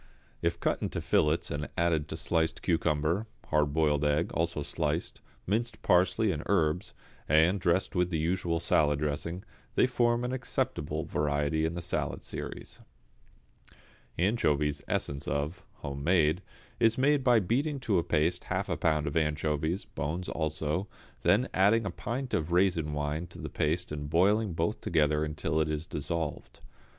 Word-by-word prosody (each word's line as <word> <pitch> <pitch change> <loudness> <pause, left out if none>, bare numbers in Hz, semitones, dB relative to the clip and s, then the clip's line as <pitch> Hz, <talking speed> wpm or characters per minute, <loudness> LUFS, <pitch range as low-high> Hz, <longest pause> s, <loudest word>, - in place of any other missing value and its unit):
If - - 0
cut - - 0
into - - -2
fillets 75 +2 +1
and 75 +1 -3
added 80 -3 +1
to 80 - -5
sliced 80 -1 0
cucumber, 85 +4 +1 0.2
hard 75 -2 +2
boiled 75 -1 +2
egg, 75 +3 +1
also 85 -2 -1
sliced, - - -2 0.2
minced 115 +5 -1
parsley 95 +4 +3
and 75 -4 -3
herbs, 85 -2 +1 0.3
and 80 +6 +4
dressed 90 +1 +1
with 90 -1 +1
the 85 - -1
usual 85 +1 0
salad 75 -3 +2
dressing, 75 +5 -3 0.3
they - - +5
form 120 -1 +1
an 125 - -2
acceptable 75 - -2
variety 75 +2 0
in 80 +1 -2
the 85 - -4
salad 90 - -2
series. - - -7 1.4
=Anchovies, 75 -7 +1
Essence 70 0 -2
of= 75 +6 -2 0.2
(home 70 0 -4
made), 85 0 +3 0.4
is 115 -1 +4
made 140 +1 +3
by 120 -3 +5
beating 135 - 0
to 105 -8 +2
a - - 0
paste 85 +1 +1
half 95 +2 -2
a 85 - -1
pound 80 -2 +1
of 70 - -3
anchovies, 80 +2 0
bones 85 +6 -4
also, 80 +3 -2 0.3
then 120 +5 +3
adding 105 +4 +4
a 95 - -2
pint 125 +4 -4
of 80 +2 0
raisin 85 -4 +2
wine 75 +3 -2
to 85 - -13
the - - -6
paste 80 +3 -1
and 75 -1 -4
boiling 100 +5 +3
both 85 +6 -1
together 75 -2 +2
until 80 +1 -1
it 80 - 0
is 75 +1 -2
dissolved. 80 +1 -4
80 Hz, 160 wpm, -30 LUFS, 75-95 Hz, 1.4 s, they